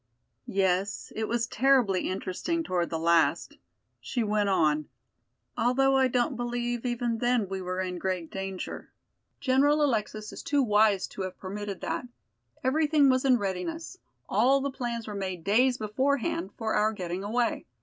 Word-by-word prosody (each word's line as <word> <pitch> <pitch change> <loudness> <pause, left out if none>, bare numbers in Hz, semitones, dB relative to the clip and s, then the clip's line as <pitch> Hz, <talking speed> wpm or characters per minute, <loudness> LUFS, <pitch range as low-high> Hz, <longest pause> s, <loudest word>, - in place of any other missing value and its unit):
"Yes, 190 +1 0
it 220 0 -2
was 235 0 0
terribly 245 -6 +2
interesting 195 - -2
toward 175 - -1
the 165 - -2
last," 165 -1 +2 0.4
she 245 -3 -2
went 210 -1 +1
on, 155 -5 +2 0.7
"although 270 +3 +3
I 265 -1 +4
don't 250 +2 0
believe 240 0 -2
even 240 -1 -1
then 240 -3 +1
we 190 0 -4
were 185 0 -3
in 180 -1 -4
great 185 -3 -3
danger. 195 -1 -5 0.5
General 285 +3 +3
Alexis 215 -5 -1
is - - -7
too 285 -2 +1
wise 210 -3 +3
to - - -7
have 185 -1 -5
permitted 200 0 -6
that. 250 - -3 0.6
Everything 295 +1 +3
was 255 +1 +1
in 255 -2 +5
readiness; 235 - -4 0.3
all 270 +2 +3
the 280 0 -2
plans 240 -3 -4
were 210 - -5
made 185 -4 -4
days 245 +6 +3
beforehand 220 -4 -1
for 220 -1 -2
our 215 +1 +2
getting 180 -1 -4
away. 235 +3 -1
220 Hz, 155 wpm, -28 LUFS, 190-255 Hz, 0.7 s, in